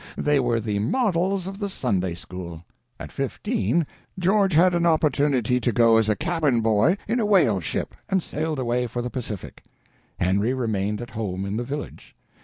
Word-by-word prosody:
They 145 Hz, -1 st, +2 dB
were 120 Hz, -3 st, +1 dB
the 105 Hz, -2 st, -2 dB
models 185 Hz, -, +1 dB
of 195 Hz, +1 st, -6 dB
the 200 Hz, -2 st, -2 dB
Sunday—school. 90 Hz, -, -3 dB, 0.3 s
At -, -, -8 dB
fifteen 140 Hz, -, -1 dB, 0.3 s
George 190 Hz, +1 st, +2 dB
had 180 Hz, +3 st, +6 dB
the 170 Hz, -1 st, +1 dB
opportunity 145 Hz, -6 st, +2 dB
to 125 Hz, -, 0 dB
go 115 Hz, 0 st, +5 dB
as 110 Hz, -1 st, +2 dB
cabin 155 Hz, -9 st, +1 dB
boy 110 Hz, -, +3 dB
in 235 Hz, +4 st, 0 dB
a 220 Hz, -, +1 dB
whale 170 Hz, -, +4 dB
ship, 85 Hz, -, -3 dB, 0.2 s
and 190 Hz, -3 st, +1 dB
sailed 155 Hz, 0 st, -3 dB
away 125 Hz, -1 st, 0 dB
for 120 Hz, +1 st, -4 dB
the 125 Hz, -, -4 dB
Pacific. 110 Hz, -7 st, -6 dB, 0.6 s
Henry 100 Hz, +8 st, +1 dB
remained 105 Hz, -3 st, -1 dB
at 120 Hz, -, -8 dB
home 100 Hz, -4 st, -3 dB
in 100 Hz, +1 st, -3 dB
the 120 Hz, -, -1 dB
village. 140 Hz, +4 st, -7 dB
125 Hz, 170 wpm, -24 LUFS, 105-170 Hz, 0.6 s, had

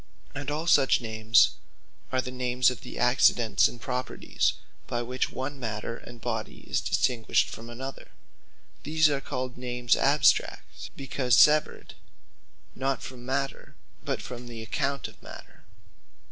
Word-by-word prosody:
And 145 Hz, 0 st, -5 dB
all 150 Hz, +3 st, -2 dB
such 140 Hz, -5 st, +4 dB
Names, 110 Hz, 0 st, +3 dB, 0.6 s
are 130 Hz, 0 st, +1 dB
the 125 Hz, -, -6 dB
names 125 Hz, 0 st, +2 dB
of 125 Hz, -, -8 dB
the -, -, -9 dB
accidents 120 Hz, -2 st, +4 dB
and 120 Hz, -, -9 dB
properties, 125 Hz, 0 st, -1 dB, 0.3 s
by 120 Hz, 0 st, -2 dB
which 125 Hz, +2 st, -2 dB
one 135 Hz, +2 st, -5 dB
Matter, 115 Hz, -1 st, -4 dB
and 120 Hz, 0 st, -12 dB
Body 115 Hz, -2 st, -4 dB
is -, -, -2 dB
distinguished 120 Hz, -3 st, +1 dB
from 115 Hz, +1 st, -9 dB
another. 130 Hz, +3 st, -8 dB, 0.7 s
These 155 Hz, +1 st, +3 dB
are 140 Hz, -1 st, -1 dB
called 130 Hz, -3 st, -4 dB
Names 125 Hz, -1 st, 0 dB
Abstract; -, -, +2 dB
Because 130 Hz, -3 st, +1 dB
Severed 150 Hz, 0 st, +4 dB, 0.8 s
(not 135 Hz, -1 st, -2 dB
from 125 Hz, -1 st, -9 dB
Matter, 135 Hz, +1 st, -3 dB, 0.3 s
but) -, -, -3 dB
from 125 Hz, -1 st, -8 dB
the 115 Hz, -2 st, -7 dB
account 140 Hz, +5 st, -2 dB
of -, -, -17 dB
Matter. -, -, -13 dB
125 Hz, 140 wpm, -27 LUFS, 120-135 Hz, 0.8 s, such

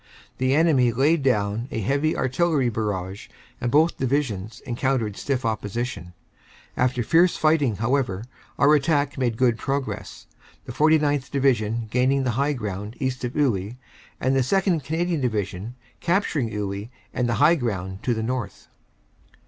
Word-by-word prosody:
The 130 Hz, +1 st, +2 dB
enemy 145 Hz, -7 st, +4 dB
laid 145 Hz, +7 st, +2 dB
down 110 Hz, -3 st, 0 dB
a -, -, -3 dB
heavy 140 Hz, +9 st, 0 dB
Artillery 135 Hz, 0 st, +1 dB
barrage 100 Hz, -3 st, -3 dB, 0.3 s
and 120 Hz, -, 0 dB
both 155 Hz, +6 st, +3 dB
Divisions 120 Hz, -5 st, -1 dB
encountered 120 Hz, -4 st, -1 dB
stiff 130 Hz, 0 st, -2 dB
opposition. 110 Hz, -3 st, -3 dB, 0.6 s
After 125 Hz, -1 st, +1 dB
fierce 170 Hz, +8 st, +4 dB
fighting, 155 Hz, -7 st, +2 dB
however, 110 Hz, -3 st, 0 dB, 0.3 s
our 145 Hz, +2 st, +5 dB
attack 145 Hz, -1 st, +1 dB
made 120 Hz, -3 st, 0 dB
good 120 Hz, -2 st, +2 dB
progress, 135 Hz, -1 st, -4 dB, 0.4 s
the -, -, -6 dB
49th. 150 Hz, -2 st, +2 dB
Division 115 Hz, -5 st, +1 dB
gaining 130 Hz, +3 st, +2 dB
the 125 Hz, -, 0 dB
high 140 Hz, +5 st, +1 dB
ground 105 Hz, -3 st, -5 dB
east 130 Hz, -2 st, -2 dB
of 125 Hz, 0 st, -3 dB
Iwuy, 115 Hz, -7 st, 0 dB, 0.4 s
and 130 Hz, +1 st, +1 dB
the -, -, +3 dB
2nd. 175 Hz, +4 st, +1 dB
Canadian 165 Hz, +2 st, -1 dB
Division 110 Hz, -2 st, -2 dB, 0.2 s
capturing 170 Hz, -, 0 dB
Iwuy 100 Hz, 0 st, -4 dB, 0.2 s
and 125 Hz, -1 st, 0 dB
the 120 Hz, -, +1 dB
high 150 Hz, +7 st, +5 dB
ground 95 Hz, -, -3 dB
to 120 Hz, -, 0 dB
the 110 Hz, -, -2 dB
north. 120 Hz, -2 st, -4 dB
125 Hz, 145 wpm, -24 LUFS, 110-145 Hz, 0.6 s, our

